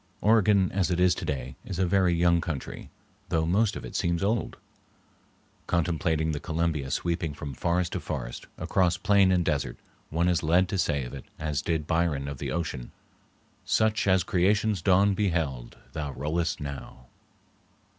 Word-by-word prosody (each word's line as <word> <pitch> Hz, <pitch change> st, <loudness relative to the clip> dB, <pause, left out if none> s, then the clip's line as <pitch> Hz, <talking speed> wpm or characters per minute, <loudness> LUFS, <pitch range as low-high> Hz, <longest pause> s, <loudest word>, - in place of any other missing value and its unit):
Oregon 105 Hz, -3 st, +4 dB
as 95 Hz, -2 st, +1 dB
it 90 Hz, -1 st, 0 dB
is 90 Hz, -1 st, +5 dB
today 65 Hz, -5 st, -4 dB
is 95 Hz, -, -5 dB
a 95 Hz, -, +2 dB
very 90 Hz, 0 st, +3 dB
young 85 Hz, 0 st, +3 dB
country, 75 Hz, -6 st, -5 dB, 0.4 s
though 80 Hz, 0 st, +1 dB
most 100 Hz, +5 st, +2 dB
of -, -, -6 dB
it -, -, -8 dB
seems 85 Hz, +1 st, 0 dB
old. 110 Hz, +4 st, 0 dB, 1.1 s
Contemplating 80 Hz, -2 st, +1 dB
the 75 Hz, -, -3 dB
Columbia 80 Hz, -4 st, -1 dB
sweeping 85 Hz, +1 st, -1 dB
from 70 Hz, -1 st, -6 dB
forest 85 Hz, +5 st, 0 dB
to -, -, -1 dB
forest, -, -, -5 dB
across 90 Hz, -1 st, +1 dB
plain 100 Hz, -1 st, +4 dB
and 90 Hz, -2 st, +2 dB
desert, 70 Hz, -6 st, -1 dB, 0.3 s
one 85 Hz, +3 st, +1 dB
is 85 Hz, -2 st, +2 dB
led 85 Hz, +4 st, +3 dB
to 95 Hz, -, -1 dB
say 70 Hz, -6 st, +1 dB
of -, -, -8 dB
it, 70 Hz, -, -8 dB
as 75 Hz, -2 st, -2 dB
did 80 Hz, -1 st, -1 dB
Byron 80 Hz, -4 st, 0 dB
of 70 Hz, -2 st, -6 dB
the -, -, -3 dB
ocean,— 80 Hz, -7 st, -3 dB, 0.7 s
"Such 110 Hz, -1 st, +1 dB
as 95 Hz, -2 st, +4 dB
Creation's 100 Hz, +4 st, +2 dB
dawn 100 Hz, +1 st, +4 dB
beheld, 80 Hz, -, -1 dB, 0.2 s
thou 75 Hz, -3 st, -4 dB
rollest 75 Hz, +6 st, -1 dB
now." 70 Hz, -3 st, -7 dB
85 Hz, 165 wpm, -27 LUFS, 75-95 Hz, 1.1 s, is